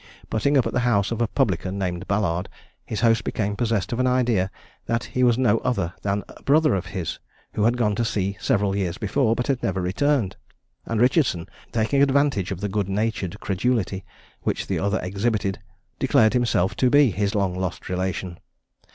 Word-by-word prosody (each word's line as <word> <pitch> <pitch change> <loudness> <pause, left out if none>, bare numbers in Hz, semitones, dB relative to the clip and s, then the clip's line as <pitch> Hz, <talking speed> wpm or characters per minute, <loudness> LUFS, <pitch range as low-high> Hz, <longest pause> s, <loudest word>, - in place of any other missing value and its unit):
Putting 140 +6 +2
up 130 - +3
at - - -2
the - - +2
house 115 -5 +2
of 115 0 -2
a 120 - +2
publican 95 -1 0
named 90 -1 -3
Ballard, 95 -3 0 0.4
his 110 - -3
host 115 -1 +3
became 105 -1 -2
possessed 115 -1 -1
of 120 - -2
an 130 - +2
idea 120 -7 +2 0.4
that 115 +1 0
he 125 - -3
was 120 -2 +4
no 120 -4 +3
other 105 -9 -1
than 100 0 -1
a - - -14
brother 155 +2 +3
of 95 -1 -2
his, 85 -1 -4 0.3
who 105 - +1
had 120 +2 +2
gone 105 -4 +2
to 120 - +1
sea 100 -3 -1
several 100 -6 +1
years 95 -3 -1
before, 115 +2 +1
but 125 - -1
had 135 -3 0
never 95 0 -1
returned; 105 +3 0 0.5
and 115 - -1
Richardson, 125 - +2 0.2
taking 120 +5 +1
advantage 140 -8 +2
of 95 -1 -5
the 105 - -1
good 100 -1 -1
natured 105 -2 -2
credulity 100 -1 -1 0.4
which - - -2
the - - -1
other 100 +2 0
exhibited, 100 +1 -1 0.4
declared 110 - +4
himself 120 -7 +1
to 130 - +3
be 145 -3 +5
his 100 +3 -1
long 100 -3 +1
lost 90 -1 -4
relation. 90 -1 -3
105 Hz, 190 wpm, -24 LUFS, 95-120 Hz, 0.5 s, be